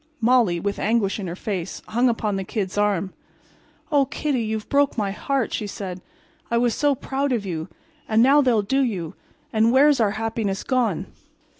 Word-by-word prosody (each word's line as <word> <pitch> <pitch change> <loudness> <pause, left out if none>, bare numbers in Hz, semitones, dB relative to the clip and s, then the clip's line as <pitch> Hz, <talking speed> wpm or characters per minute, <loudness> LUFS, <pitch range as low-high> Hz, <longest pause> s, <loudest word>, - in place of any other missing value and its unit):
Molly, 230 -7 +3
with 200 +3 -3
anguish 215 -2 +1
in 195 - -4
her 170 - -4
face, 190 -2 -4
hung 240 +3 +3
upon 215 -3 -1
the 195 - -2
Kid's 190 -1 -3
arm. 200 -2 0 0.8
"Oh, 285 -2 +4
Kiddy, 275 -1 -2
you've 220 -1 -3
broke 285 -2 +2
my 205 -3 0
heart," 265 +4 -1
she 210 - -2
said. 185 -3 -6 0.5
"I 235 - +1
was 240 -1 +2
so 290 -1 +2
proud 275 +2 -2
of 230 -5 -1
you—and 215 - -2
now 280 +3 +6
they'll 240 -6 +2
do 270 +7 +1
you—and 220 +2 -2
where's 280 +2 +5
our 210 -3 +2
happiness 225 -3 -2
gone?" 240 - 0
220 Hz, 170 wpm, -23 LUFS, 195-255 Hz, 0.8 s, now